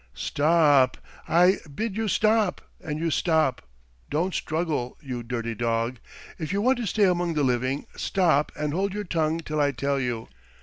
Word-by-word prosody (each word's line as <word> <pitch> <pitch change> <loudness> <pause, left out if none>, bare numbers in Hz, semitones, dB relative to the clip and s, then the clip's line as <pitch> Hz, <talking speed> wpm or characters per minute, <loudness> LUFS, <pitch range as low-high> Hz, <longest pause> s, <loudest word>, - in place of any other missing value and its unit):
"Sto 145 - -4
op! 145 -6 +5 0.3
I 180 +3 +5 0.2
bid 220 +1 -2
you 225 0 -1
stop 215 -1 +2 0.2
and 150 -2 -3
you 165 +1 -1
stop. 160 -4 +1 0.5
Don't 170 +5 0
struggle, 155 -7 -2
you 125 -4 -5
dirty 115 -1 -3
dog! 115 +1 -1 0.4
If 155 -3 -4
you 200 - 0
want 250 +4 +2
to 235 - -2
stay 210 +2 +1
among 175 -2 +1
the 150 - +1
living, 130 +2 0
stop 165 -6 +1
and 150 -1 -2
hold 195 +3 -1
your 210 - -2
tongue 165 -2 0
till 155 -2 -2
I 145 -1 +3
tell 140 +2 -1
you. 120 -3 -3
155 Hz, 175 wpm, -25 LUFS, 130-180 Hz, 0.5 s, op